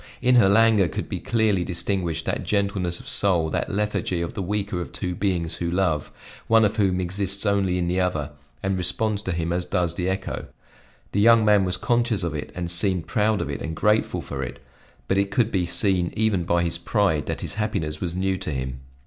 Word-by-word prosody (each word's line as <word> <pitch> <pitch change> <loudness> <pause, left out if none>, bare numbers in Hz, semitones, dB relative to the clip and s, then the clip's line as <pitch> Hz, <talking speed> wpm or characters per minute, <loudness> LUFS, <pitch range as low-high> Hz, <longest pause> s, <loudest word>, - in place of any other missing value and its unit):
In 125 0 +3
her 95 -5 +6
languor 110 -2 +5
could - - -4
be - - -4
clearly 110 -5 +1
distinguished 90 -1 -2
that - - -1
gentleness 100 -4 -1
of - - -12
soul, 85 -6 +1
that - - -1
lethargy 100 -3 -1
of 85 0 -3
the - - -4
weaker 100 -1 -2
of - - -6
two 90 -2 -3
beings 85 -3 -1
who 85 - -2
love, 85 -5 0 0.4
one 115 -1 +5
of 105 - -1
whom 95 -3 +2
exists 100 +2 -2
only 100 -3 +2
in 90 -1 0
the 90 +2 0
other 80 -6 -1 0.3
and 95 -1 0
responds 105 +4 +1
to 95 - -3
him 85 0 -1
as 90 0 -1
does 90 -3 0
the 90 +1 -2
echo. 95 0 -3 0.6
The 100 - 0
young 115 0 +6
man 105 -2 +5
was 90 0 0
conscious 120 -5 +1
of 85 -3 -2
it 75 - -5
and 85 -1 -3
seemed 90 0 +1
proud 110 -2 +1
of - - -3
it - - -5
and 80 0 -4
grateful 105 +6 +1
for 70 - -5
it; 65 0 -5 0.5
but 95 - +2
it 100 0 +1
could 115 -2 +1
be 90 -3 0
seen 90 -2 +1
even 105 -5 +1
by 85 0 +2
his 85 0 -1
pride 85 -6 +1
that - - -3
his - - -4
happiness 100 -8 -2
was 85 -1 -3
new 95 0 0
to - - -4
him. 65 -2 -4
95 Hz, 215 wpm, -24 LUFS, 85-105 Hz, 0.6 s, her